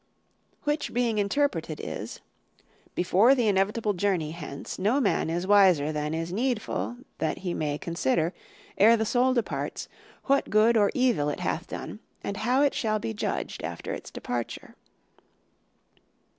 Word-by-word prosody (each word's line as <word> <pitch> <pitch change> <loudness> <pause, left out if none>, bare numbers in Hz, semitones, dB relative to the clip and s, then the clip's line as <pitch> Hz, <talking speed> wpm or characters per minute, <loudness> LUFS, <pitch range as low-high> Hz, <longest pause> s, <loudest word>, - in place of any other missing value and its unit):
Which 295 -4 -1
being 235 -3 +1
interpreted 280 +9 0
is: - - -6 0.7
"Before 195 +9 +4
the 245 -4 +1
inevitable 205 +2 +1
journey 180 -5 0
hence, 145 -4 -7
no 215 +9 +2
man 210 - +1
is 175 +2 -1
wiser 185 -7 +5
than 150 +1 -2
is 165 +2 -3
needful 240 +1 -1 0.2
that 160 - -1
he 175 - -1
may 150 -3 -1
consider, 165 +1 0 0.5
ere 225 +3 +7
the 220 - 0
soul 255 +3 +2
departs, 235 - -2 0.4
what 275 0 +2
good 220 +2 +4
or 205 -2 +4
evil 240 - +2
it 145 - -4
hath - - -2
done - - -7 0.2
and 200 - -3
how 250 +5 +2
it 285 - +3
shall 215 -2 0
be 115 - -4
judged 105 - -3
after - - -4
its - - -7
departure." 120 -1 -5
205 Hz, 145 wpm, -27 LUFS, 165-235 Hz, 0.7 s, ere